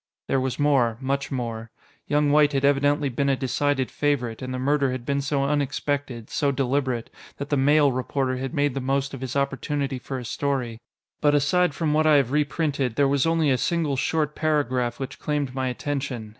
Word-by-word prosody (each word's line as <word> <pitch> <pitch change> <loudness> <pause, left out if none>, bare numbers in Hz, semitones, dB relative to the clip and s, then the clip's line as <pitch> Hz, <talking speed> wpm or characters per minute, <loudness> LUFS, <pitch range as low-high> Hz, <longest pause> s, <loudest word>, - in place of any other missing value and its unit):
There 135 - +1
was 130 -1 -2
more, 135 -6 +2
much 140 +2 -2
more. 115 -3 -4 0.4
Young 145 0 +2
White 145 0 +4
had 135 0 +1
evidently 145 +1 +2
been 140 +2 0
a 135 - +3
decided 135 0 0
favorite, 130 -6 -1
and 130 0 -5
the 130 - -3
murder 140 +1 +1
had 125 -2 -5
been 140 +1 0
so 140 0 0
unexpected, 140 -3 -2
so 140 -1 +1
deliberate, 130 -3 -1 0.3
that 140 +1 -6
the - - +3
Mail 145 +1 +4
reporter 130 +1 -1
had 130 +1 -4
made 145 -3 +1
the 135 - -3
most 135 +1 -1
of 135 - -7
his 130 -1 -5
opportunity 140 0 -1
for 135 +2 -5
a 125 - -6
story. 125 -3 -2 0.4
But 145 -1 +4
aside 150 +3 +2
from 155 -3 0
what 155 +1 +3
I 155 - +6
have 135 -3 +3
reprinted, 145 -4 0
there 140 +1 +3
was 140 +2 +2
only 165 -3 +2
a 130 - +1
single 165 -5 0
short 150 +2 0
paragraph 130 -6 0
which 135 0 -6
claimed 145 -4 -2
my 130 -1 -1
attention. 130 -3 -3
140 Hz, 200 wpm, -24 LUFS, 130-145 Hz, 0.4 s, I